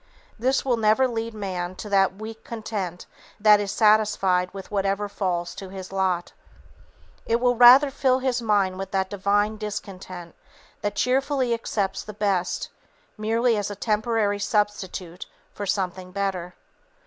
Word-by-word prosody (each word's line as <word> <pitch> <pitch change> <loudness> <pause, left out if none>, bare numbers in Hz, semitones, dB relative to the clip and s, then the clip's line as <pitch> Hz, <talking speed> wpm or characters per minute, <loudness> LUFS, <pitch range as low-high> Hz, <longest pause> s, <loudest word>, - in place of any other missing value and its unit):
This 260 +4 +1
will 250 -3 +2
never 220 +4 +3
lead 230 -2 -4
man 185 -3 -4
to 210 - -8
that 195 -1 +3
weak 220 +2 -9
content 205 -6 -5 0.3
that 210 0 +6
is 200 -1 -2
satisfied 210 -4 +3
with 195 +1 -9
whatever 200 0 0
falls 180 -4 -2
to 195 0 -8
his 190 -1 -8
lot. 185 -2 -1 0.9
It 230 +1 +2
will 245 0 +2
rather 250 +4 +8
fill 265 -2 +2
his 255 -2 -1
mind 200 -4 +1
with 195 0 -4
that 190 -1 -1
divine 205 +2 +1
discontent 190 -4 -7 0.5
that 205 - -2
cheerfully 265 -1 +1
accepts 205 -4 -2
the 210 - -9
best, 200 -4 -1 0.5
merely 230 +2 +1
as 205 -1 -2
a 205 - -5
temporary 210 -1 0
substitute 195 -4 -2 0.3
for 205 - -5
something 185 -1 -2
better. 185 -2 -3
205 Hz, 145 wpm, -24 LUFS, 190-225 Hz, 0.9 s, rather